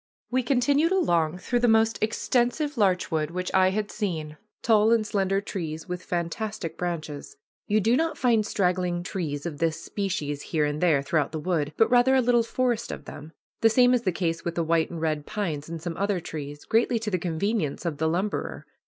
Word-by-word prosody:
We 255 +1 +2
continued 280 +6 +2
along 170 - +2
through 240 +7 -1
the 240 - +3
most 225 0 +3
extensive 245 +6 0
larch 190 -5 +1
wood 155 -2 0
which 180 +2 -4
I 185 0 +5
had 210 +2 -2
seen 160 -8 -3 0.3
tall 220 -1 +4
and 230 -2 +3
slender 195 -1 0
trees 160 -6 -5
with 180 0 -4
fantastic 175 +2 -3
branches. 160 -5 -5 0.3
You 210 +1 +3
do 230 +5 +3
not 325 +4 0
find 235 -4 +3
straggling 180 -3 0
trees 155 -6 -4
of 155 -4 -5
this 165 -1 0
species 155 -8 -3
here 155 -1 0
and 150 +1 -2
there 155 -6 +3
throughout 150 0 0
the 155 - -2
wood, 155 -3 -1
but 225 - +3
rather 250 +2 +5
a 260 - +5
little 240 -1 +3
forest 235 0 -1
of - - -7
them. 155 +3 -10 0.3
The 225 - +5
same 245 +2 +5
is 250 - +2
the 190 - 0
case 165 -1 -2
with 170 0 -3
the 170 - 0
white 165 0 +1
and 170 - -6
red 155 -2 -1
pines 160 -8 -3
and 165 0 -5
some 165 0 -5
other 200 -1 0
trees, 145 -3 -7
greatly 230 +1 +2
to 220 -1 -3
the 185 - 0
convenience 175 0 -2
of 160 -4 -2
the 160 - +1
lumberer. 190 +5 -2
185 Hz, 205 wpm, -26 LUFS, 160-225 Hz, 0.3 s, I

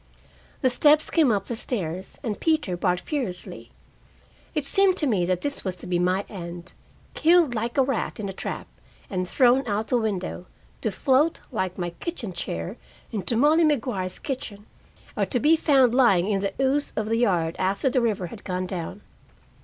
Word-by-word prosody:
The 260 - +4
steps 300 +4 +4
came 310 -7 +4
up 200 -2 0
the 235 - -4
stairs, 190 -6 -4
and 215 -5 -3
Peter 310 - +1
barked 180 0 0
furiously. 245 - -5 0.9
It 300 -3 0
seemed 385 +4 +4
to 300 - 0
me 195 -10 +1
that 180 -1 0
this 285 0 -3
was 185 -2 -2
to 180 - -11
be 180 -1 0
my 185 +3 +1
end, 175 -2 -8 0.4
killed 330 -4 +4
like 235 +2 -3
a 270 - +6
rat 255 -5 -2
in 205 - -3
a 195 - -5
trap - - -5 0.5
and 185 -2 -1
thrown 255 +5 +4
out 210 +1 -1
the 250 - +3
window, 190 -4 -3 0.3
to 220 - 0
float, 275 - +2
like 185 -6 -2
my 175 -2 -3
kitchen 230 - -5
chair, 85 - -4 0.3
into 220 +2 -1
Mollie 305 +6 +5
Maguire's 235 - +1
kitchen, 220 -7 -6 0.5
or - - 0
to 245 - 0
be 305 +6 +5
found 270 -6 +4
lying 200 -9 +4
in 205 -2 +1
the 200 - -2
ooze 270 +2 +1
of 215 - -1
the 225 +1 0
yard 175 -8 +1
after 195 +8 0
the 255 -1 +2
river 215 -6 0
had 200 +4 -9
gone 185 -1 -2
down. 185 +2 -5
220 Hz, 185 wpm, -25 LUFS, 185-270 Hz, 0.9 s, a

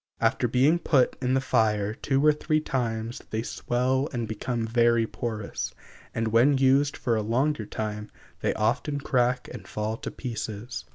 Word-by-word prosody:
After - - +2
being 135 +8 +3
put 140 -7 +3
in 130 0 +1
the - - +3
fire 105 -5 +1
two 135 +4 0
or 150 - +7
three 155 +1 0
times 115 -5 -2
they 110 +1 -2
swell 130 +4 0
and 120 -3 -3
become 115 +2 -2
very 115 0 +3
porous, 110 -2 -4 0.4
and 115 -1 0
when 125 +6 +4
used 135 +2 +3
for 120 -3 0
a 110 - +1
longer 120 +2 0
time 105 -1 -4 0.3
they - - 0
often 145 -1 0
crack 125 -2 +1
and - - -9
fall 105 +1 -3
to 140 +2 -5
pieces. 110 -4 -5
120 Hz, 165 wpm, -27 LUFS, 110-135 Hz, 0.4 s, or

